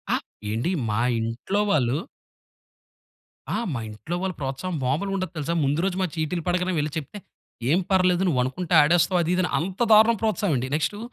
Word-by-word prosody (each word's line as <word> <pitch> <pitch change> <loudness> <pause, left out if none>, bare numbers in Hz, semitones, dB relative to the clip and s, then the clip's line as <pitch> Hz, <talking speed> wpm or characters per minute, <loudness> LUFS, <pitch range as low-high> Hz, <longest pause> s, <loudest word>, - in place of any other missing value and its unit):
అ! - - +2 0.3
ఏండి 115 - -1 0.2
మా 105 +2 0 0.2
ఇంట్లో 115 - -2
వాళ్ళు 135 -7 +2 1.5
ఆ! - - 0 0.2
మా 120 - -2
ఇంట్లో 105 +11 -6
వాళ్ళ 190 -1 -2
ప్రోత్సాహం 135 +7 -3
మాములుగా 160 +10 0
ఉండదు 185 -3 -3
తెలుసా! 155 +3 -2
ముందు 140 +3 +1
రోజు 195 - -1
మా - - +2
చీటీలు 160 +1 -2
పడగానే 180 +1 0
వెళ్లి 150 0 -1
చెప్తే 155 +7 -6 0.5
"ఏం 165 +5 +4
పర్లేదు 185 -1 +3
నువ్వనుకుంటే 140 +4 -1
ఆడేస్తావు." 170 +4 +3
అది 165 - 0
ఇది 185 - +2
అని 180 - -1
అంత 185 +3 -4
దారుణం 220 +2 +6
ప్రోత్సాహం 215 -5 +1
అండి. 125 +1 -2
నెక్టు 160 +7 -1
170 Hz, 175 wpm, -24 LUFS, 140-185 Hz, 1.5 s, దారుణం